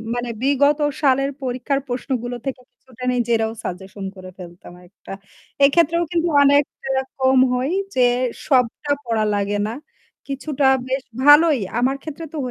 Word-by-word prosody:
মানে 240 0 -3
বিগত 285 +2 +3 0.2
সালের 275 0 +2
পরীক্ষার 255 +2 -1
প্রশ্নগুলো 245 -1 -3
থেকে 260 -1 -4
কিছুটা 255 -1 -15
নিজেরাও 230 -2 0
সাজেশন 190 +2 -7
করে 185 0 -10
ফেলতাম 175 -1 -12
একটা। 195 - -15 0.5
এক্ষেত্রেও 335 +3 +3
কিন্তু 340 0 0
অনেকটা 280 -1 +1 0.3
কম 260 0 +4
হয় 255 +5 -1 0.2
যে 255 - +2 0.5
সবটা 260 +1 +1
পড়া 225 -2 0
লাগে 205 0 -1
না। 225 - -4 0.5
কিছুটা 275 0 -1 0.2
বেশ 265 0 -1 0.2
ভালোই। 295 -1 +6 0.2
আমার 265 +2 +1
ক্ষেত্রে 320 +1 -7
তো - - -5
260 Hz, 135 wpm, -21 LUFS, 235-285 Hz, 0.5 s, ভালোই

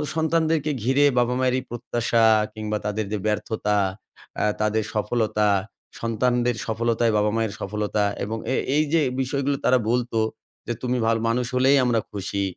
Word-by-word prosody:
সন্তানদেরকে 160 -1 +1
ঘিরে 135 +4 +3
বাবা 120 0 +1
মায়ের 130 -1 +2
এই - - -8
প্রত্যাশা 120 -1 0 0.3
কিংবা 110 -1 -3
তাদের 105 0 -1
যে, 105 - 0
ব্যর্থতা, 105 0 0 0.6
অ্যা - - +1 0.2
তাদের 110 +1 +1
সফলতা, 105 -1 0 0.5
সন্তানদের 120 +1 +1
সফলতাই 115 +1 +1
বাবা 105 0 +2
মায়ের 110 -3 -1
সফলতা 105 +1 -1 0.2
এবং 110 +3 -3 0.2
এ - - +2 0.2
এই 150 - +4
যে, 165 - +4 0.2
বিষয়গুলো 140 +2 -1
তারা 130 - +5
বলত 120 0 0 0.6
যে, 120 - -1
"তুমি 125 0 0
ভালো 115 0 +2
মানুষ 125 +2 0
হলেই 130 +2 +4
আমরা 120 -2 +2
খুশি। 100 0 -3
115 Hz, 155 wpm, -24 LUFS, 105-125 Hz, 0.6 s, তারা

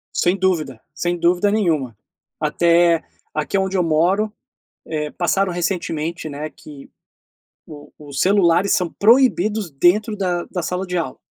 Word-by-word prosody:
Sem 180 +2 +2
dúvida, 160 - -1
sem 175 0 -1
dúvida 175 +4 +2
nenhuma, 160 - 0 0.4
até, 170 +2 +3 0.3
aqui 155 +5 -1
onde 190 0 -1
eu 180 - +2
moro, 180 +7 +1 0.5
eh, 150 -2 -3
passaram 185 +2 0
recentemente, 170 -2 -3
né, 150 +1 -6
que 145 -3 -13 0.8
o 145 -2 -12
os 145 -2 -7
celulares 190 -1 +3
são 180 -3 0
proibidos 215 -4 +3
dentro 205 +10 +2
da 180 -3 -1
da 180 - -4
sala 180 +3 -2
de 180 -1 -3
aula. 165 - -3
175 Hz, 140 wpm, -20 LUFS, 155-195 Hz, 0.8 s, até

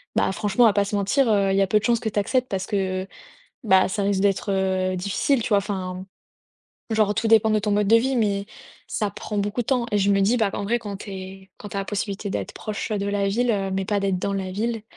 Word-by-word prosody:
Bah, - - +2
franchement, 205 +4 +1
on - - +8
va 215 - +3
pas 205 0 +2
se 205 - -3
mentir, 215 +6 +2
heu, 200 -2 +2
il 195 - +1
y - - +4
a 195 - +2
peu 210 - +3
de - - -14
chances 235 0 +2
que 220 - -2
tu 210 - -8
acceptes 255 +5 0
parce 190 -1 -2
que, 190 -2 -1 0.6
bah, 190 -3 +4
ça 200 +2 -2
risque 200 -1 +1
d'être, 200 0 +1
heu, 185 -1 0
difficile, 200 +7 0
tu - - -3
vois? 205 - +5
Enfin, 190 -2 -4 0.8
genre, 215 -2 +2
tout 225 - 0
dépend 220 -1 +5
de 215 - +3
ton 210 0 -1
mode 205 0 +2
de 230 - +7
vie, 260 +3 +1
mais 200 -3 +1 0.4
ça 210 -2 -1
prend 210 +3 -5
beaucoup 205 +4 -1
de - - -20
temps, 250 -3 +1
et 210 - +3
je 200 0 +2
me 195 0 +3
dis, 210 +5 +3
bah, 220 -3 +2
qu'en 205 - -4
vrai, 235 +4 +1
quand 205 -3 -6
tu 205 - -9
es 190 0 -9
quand 205 - -9
tu - - -6
as - - 0
la 195 - -4
possibilité 205 0 -3
d'être - - -4
proche, 215 +1 -5
heu, 210 - 0
de 200 - -2
la 200 -1 0
ville, 240 +5 +1
heu, 195 -2 -1
mais 190 0 -1
pas 205 0 0
d'être 195 -2 0
dans 200 - -2
la 190 -1 -3
ville, 225 +2 -2
200 Hz, 280 wpm, -23 LUFS, 195-215 Hz, 0.8 s, on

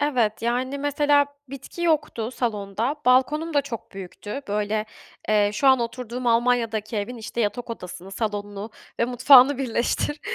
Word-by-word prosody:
Evet, 245 -8 0
yani 255 +4 -1
mesela 290 0 +2 0.2
bitki 275 +5 -8
yoktu 295 -9 0
salonda, 225 +2 -2
balkonum 300 +6 +3
da 285 - +3
çok 245 -5 -8
büyüktü. 195 +6 -7
Böyle, 210 +1 -1 0.4
eee, 210 -1 +3
şu 210 +6 0
an 260 -1 +6
oturduğum 240 +1 -4
Almanya'daki 230 -2 +1
evin, 210 +4 -3
işte, 235 +1 -5
yatak 235 +3 -2
odasını, 180 -3 -8
salonunu 205 0 -4 0.3
ve - - +4
mutfağını 255 +2 +6
birleştir. 265 +3 -1
240 Hz, 140 wpm, -24 LUFS, 215-275 Hz, 0.4 s, an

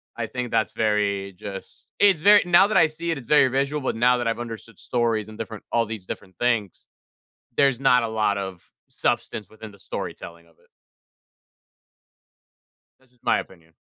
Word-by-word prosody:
I - - -3
think 125 -1 -4
that's 110 - +1
very, 100 -2 0
just, 95 0 -9
it's 195 -6 +5
very 205 +2 +7
now 175 +2 +6
that 215 - +1
I 160 - +6
see 165 +2 -4
it, 160 - -2
it's 120 - -14
very 150 -3 +5
visual, 140 +3 -1
but 130 - -1
now 125 +2 +4
that 120 - -2
I've 115 +1 -1
understood 115 -3 -8
stories 115 -3 -1
and 110 - -11
different 110 -1 -7
all 115 -1 +2
these 110 -3 -7
different 95 0 -8
things, 115 -6 -1 0.7
there's 135 -3 +3
not 125 -3 +4
a - - -1
lot 105 -2 0
of 95 -3 -7 0.2
substance 105 -4 -2
within 110 -1 -11
the 100 - -18
storytelling 85 -2 -7
of 85 - -27
it. - - -29 2.3
That's 130 -2 -29
just 125 -1 -34
my - - +3
opinion. 85 -3 -10
115 Hz, 180 wpm, -24 LUFS, 100-130 Hz, 2.3 s, very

